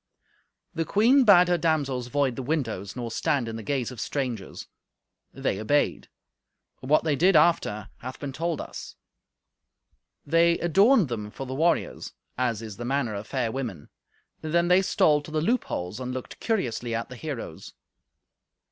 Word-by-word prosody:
The 165 -1 -1
queen 235 - +4
bade 180 -4 +7
her 175 -1 +2
damsels 140 -7 0
void 135 -1 0
the 130 - -4
windows, 120 - -3
nor 120 -2 -5
stand 125 +1 0
in 115 - -5
the 115 - -5
gaze 130 +1 -2
of 125 - -9
the - - -1
strangers. 125 -8 -4 0.7
They 95 - -2
obeyed; 145 +7 +1 0.7
but 130 - -9
what 155 - +4
they 155 -3 +1
did 180 +6 +4
after 150 - +3
hath 130 +1 -8
been 140 -2 -5
told 165 +1 -2
us. - - -8 1.3
They 170 +2 +4
adorned 195 - +4
them 110 -4 -4
for 135 - -7
the 130 - -5
warriors, 165 +5 0 0.2
as 120 -3 -1
is 110 -3 -8
the 120 - -6
manner 130 -3 0
of 100 +2 -6
fair 125 -4 -1
women; 115 - -5 0.5
then 170 +2 +1
they 180 +1 +6
stole 150 -5 +3
to 145 - -11
the 155 0 -1
loopholes 140 - -1
and 125 0 -4
looked 130 0 -7
curiously 120 - -1
at 115 - -3
the 125 - -8
heroes. 125 - -7
135 Hz, 165 wpm, -26 LUFS, 120-165 Hz, 1.3 s, bade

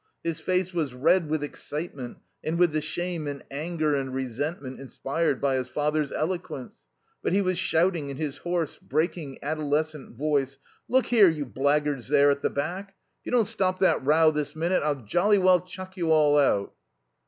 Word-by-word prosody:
His 165 -1 -2
face 185 +2 0
was 150 -7 -2
red 155 +5 +3
with 155 -1 0
excitement, 145 -3 -5 0.3
and 160 +2 -1
with 175 -1 +4
the 155 0 0
shame 165 +1 -3
and 140 -1 -5
anger 155 +1 -1
and 135 -2 -1
resentment 130 +2 -4
inspired 135 +2 -1
by 135 -2 +1
his 130 - -2
father's 150 -1 -1
eloquence. 170 -6 -4 0.3
But - - -1
he 200 - +3
was 185 -1 0
shouting 165 -4 +1
in 135 - -6
his 145 -2 -3
hoarse, 175 -3 -2
breaking, 155 -1 -2
adolescent 150 -2 -2
voice: 140 -2 0 0.3
"Look 260 0 +3
here, 215 -6 +6
you 150 -3 -2
blackguards 145 0 0
there 145 0 +5
at 140 0 -2
the - - +1
back. 185 +7 -4 0.2
If - - -44
you - - -3
don't 240 -3 +4
stop 185 -1 0
that 185 -7 +2
row 155 +3 +5
this 150 -1 -3
minute, 170 +4 +1
I'll 145 -4 -1
jolly 200 - +3
well 185 -1 +5
chuck 185 +1 -9
you 170 -4 -1
all 150 -2 +5
out." 130 -9 +2
155 Hz, 180 wpm, -26 LUFS, 140-175 Hz, 0.3 s, here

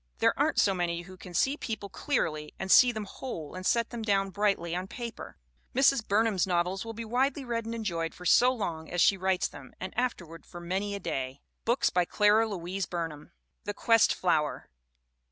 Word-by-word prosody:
There - - +3
aren't - - +1
so 195 - +4
many 175 -1 -2
who 185 +1 -12
can 180 -1 -11
see 270 - +2
people 215 -7 -4
clearly 155 - -2
and 190 0 -3
see 250 -1 +8
them 220 -2 -4
whole 185 - -7
and 185 0 -6
set 230 +4 +1
them 235 - -5
down 195 -3 +1
brightly 190 -4 0
on 180 +1 -3
paper. 235 - -7 0.4
Mrs. 270 -3 +4
Burnham's 205 -2 +2
novels 180 +1 0
will 225 0 -7
be 230 +1 -5
widely 265 +4 0
read 230 -2 -2
and 230 +1 -4
enjoyed 170 -7 -3
for 180 - -11
so 245 +8 +6
long 170 -10 -4
as 175 - -3
she 195 - +5
writes 190 -1 0
them 130 -2 -13
and 185 0 -6
afterward 175 -10 -3
for 175 - -10
many 190 +4 -2
a - - -4
day. 135 -6 -4 0.2
BOOKS 235 +4 +2
RY 180 -1 +4
CLARA 210 +4 +3
LOUISE 190 -1 -4
BURNHAM 165 -4 -5 0.3
The 205 - -3
Quest 230 +1 +4
Flower. 155 -5 0
195 Hz, 195 wpm, -29 LUFS, 175-225 Hz, 0.4 s, see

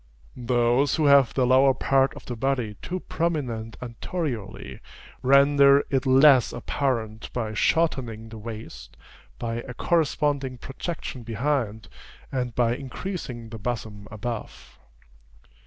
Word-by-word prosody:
Those 120 +2 +2
who 155 - +1
have 140 -3 +6
the 130 - +3
lower 130 +1 +5
part 135 0 +2
of - - -11
the 120 - -5
body 125 -3 -1
too 185 0 -4
prominent 125 -10 -3
anteriorly, 125 - -5 0.4
render 140 +1 +5
it 135 0 +1
less 130 -1 +6
apparent 115 -4 -2
by 110 -3 -3
shortening 120 -5 0
the 110 0 -9
waist, 110 0 -9 0.4
by 115 -1 -3
a 125 +1 -7
corresponding 145 -5 0
projection 135 +1 -6
behind, 115 -1 -2 0.4
and 125 -3 -2
by 120 -1 +2
increasing 130 - -6
the 110 0 -8
bosom 105 -2 -5
above. 110 +1 -7
125 Hz, 120 wpm, -25 LUFS, 115-140 Hz, 0.4 s, have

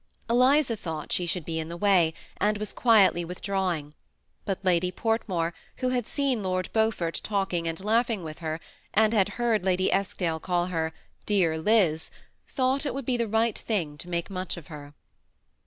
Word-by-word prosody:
Eliza 250 +2 +4
thought 160 -6 -6
she 175 - +1
should 170 -2 -2
be 160 -1 -2
in 160 0 -4
the 170 - -6
way, 180 -4 +4 0.3
and 210 0 +1
was 210 0 -4
quietly 205 -7 +4
withdrawing, 180 -4 -2 0.5
but 195 -2 -1
Lady 180 0 +2
Portmore, 185 -6 -1 0.2
who 255 - 0
had 245 -3 -1
seen 275 -6 0
Lord 185 -1 -2
Beaufort 220 -7 0
talking 190 -5 -1
and 165 0 -2
kuighii^ 220 +1 +1
with 155 -1 -7
her, 160 -1 -3 0.4
and 220 +1 +4
had 200 -3 +3
heard 235 -4 +1
Lady 185 0 +2
Eskdale 180 -4 -1
call 175 0 0
her 165 -3 -1 0.4
'^Dear 170 -6 +2
Liz," 180 -8 +3 0.4
thought 265 +1 0
it - - -3
would 275 -2 -4
be 255 - +1
the 235 -1 0
right 225 +1 +1
thing 170 -10 -2
to 180 - -7
make 170 +2 -2
much 185 -2 -3
of 170 - -11
her. 145 -1 -10
190 Hz, 175 wpm, -27 LUFS, 170-225 Hz, 0.5 s, Eliza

